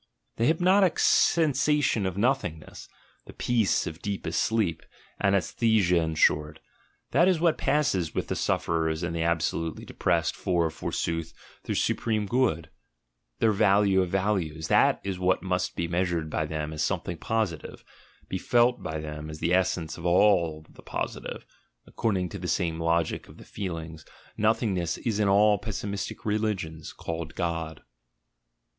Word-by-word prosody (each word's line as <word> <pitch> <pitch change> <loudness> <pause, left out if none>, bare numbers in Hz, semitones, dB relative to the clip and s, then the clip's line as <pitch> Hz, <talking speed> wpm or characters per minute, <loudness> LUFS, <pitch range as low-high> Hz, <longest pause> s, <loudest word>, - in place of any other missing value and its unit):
The 115 - +1
hypnotic 180 +4 +3
sensation 150 - +3
of 95 0 -4
nothingness, 100 - -2 0.4
the - - -10
peace 115 -5 +1
of 80 +2 -7
deepest 100 -5 -2
sleep, 100 -9 0 0.4
anaesthesia 100 -1 +2
in 80 -1 0
short 75 0 +2 0.3
— - - -41
that 170 +7 +4
is 185 -4 +3
what 165 -1 +2
passes 120 - +1
with - - -1
the - - -2
suf - - 0
ferers 80 0 0
and 85 -1 -2
the 85 - -1
absolutely 80 -1 -1
depressed - - 0
for, 85 -3 0
forsooth, 80 +1 -3 0.3
their - - -2
supreme 110 -2 0
good, 100 -10 0 0.7
their 110 - +3
value 100 -1 +3
of 90 - -1
values; 90 -5 -1
that - - +4
is 95 -2 -3
what 90 -1 +1
must 90 -1 -1
be 85 - -2
treasured 85 -2 -1
by 80 - -1
them 75 0 -4
as 75 - -4
something 85 +2 -2
positive, 110 -8 -3 0.4
be 95 - -3
felt 120 +3 +2
by 80 - -4
them 75 0 -6
as 75 - -7
the 85 +3 0
essence 90 -4 0
of - - -9 0.7
the - - -15
Positive - - -5 0.4
(according 95 -6 -1
to 100 - -7
the 90 - -5
same 85 -3 -1
logic 85 0 0
of - - -14
the - - -13
feelings, 80 -5 -6 0.3
nothingness 100 -6 0
is 110 -3 -2
in 105 - +2
all 105 +1 +4
pessimistic 100 -2 -5
religions 105 -7 -2
called 80 -1 -6
God). 80 -2 -3
90 Hz, 150 wpm, -27 LUFS, 80-110 Hz, 0.7 s, that